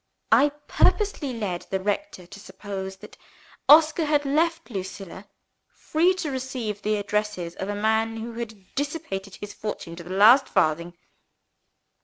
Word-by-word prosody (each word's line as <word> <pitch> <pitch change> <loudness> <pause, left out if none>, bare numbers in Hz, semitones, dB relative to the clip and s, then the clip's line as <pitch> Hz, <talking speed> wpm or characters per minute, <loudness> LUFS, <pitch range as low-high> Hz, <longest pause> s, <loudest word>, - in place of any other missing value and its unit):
I 290 - +6 0.2
purposely 400 -10 +2
led 205 -7 -4
the 190 - -1
rector 205 - -3
to 200 +3 -12
suppose 190 -1 -7
that 190 - -14 0.5
Oscar 315 +2 +7
had 295 -1 +2
left 330 +1 0
Lucilla 190 -1 -7 0.5
free 345 +4 +2
to 325 -6 -3
receive 255 -6 -4
the 215 0 0
addresses 205 -4 -2
of 190 - -4
a 205 - -2
man 220 +2 +1
who 230 +1 -6
had 220 -5 -8
dissipated 270 - -4
his 205 0 -8
fortune 205 -5 -6
to 170 - -8
the 175 - -12
last 220 +8 +6
farthing. 170 +3 0
210 Hz, 145 wpm, -25 LUFS, 190-280 Hz, 0.5 s, Oscar